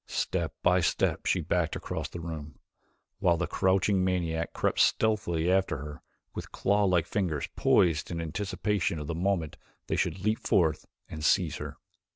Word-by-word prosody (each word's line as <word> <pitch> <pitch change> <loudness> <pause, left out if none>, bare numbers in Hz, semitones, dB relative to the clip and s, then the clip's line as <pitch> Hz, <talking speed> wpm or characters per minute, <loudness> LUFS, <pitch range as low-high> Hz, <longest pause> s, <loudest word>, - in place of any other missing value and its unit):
Step 85 -6 -2
by 90 +1 +4
step 85 - 0
she - - +2
backed - - 0
across - - -4
the 85 - -7
room, 80 -3 -7 0.6
while 90 -4 +3
the 90 - 0
crouching 95 +1 +2
maniac 85 -3 -1
crept - - -1
stealthily 90 -6 +2
after 95 -4 +2
her 75 +2 -8 0.3
with - - -7
claw 100 +1 +1
like 90 -4 +2
fingers 85 -7 -1
poised 80 -4 +3
in 85 - -3
anticipation 95 +2 -1
of 75 - -5
the 85 - -3
moment 85 -2 -1 0.3
they - - -1
should 85 +1 0
leap 110 +1 +2
forth 85 -8 +1 0.2
and 75 -1 -7
seize - - +2
her. - - -7
85 Hz, 165 wpm, -29 LUFS, 80-95 Hz, 0.6 s, by